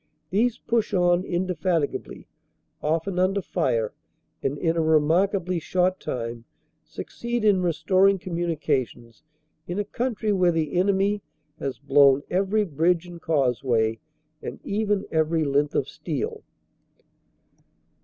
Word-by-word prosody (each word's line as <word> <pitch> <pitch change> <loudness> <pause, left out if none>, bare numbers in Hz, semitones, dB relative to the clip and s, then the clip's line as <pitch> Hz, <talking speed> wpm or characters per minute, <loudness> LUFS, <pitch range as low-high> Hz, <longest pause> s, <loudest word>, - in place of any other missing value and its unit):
These 225 +5 +2
push 230 -4 -1
on 175 0 +3
indefatigably, 175 -4 -2 0.6
often 165 +4 -1
under 190 +2 +2
fire, 115 - -1 0.5
and 140 +2 -1
in 165 +1 0
a 165 - +2
remarkably 170 +4 +2
short 185 +3 0
time 115 -1 -5 0.4
succeed 235 -1 -4
in 200 -3 +4
restoring 185 +3 +3
communica 170 -6 -1
tions 115 -1 -18 0.5
in 175 - -4
a 205 - +1
country 225 -1 -1
where 180 -2 +3
the 160 -3 -1
enemy 195 +2 +2 0.4
has 135 -2 -3
blown 140 0 +4
every 200 +3 +2
bridge 170 +2 +1
and 175 -1 -10
causeway, 125 -6 +1 0.4
and - - -6
even 205 -1 0
every 160 0 +1
length 145 0 +1
of - - +1
steel. 450 0 -4
175 Hz, 120 wpm, -25 LUFS, 145-195 Hz, 0.6 s, in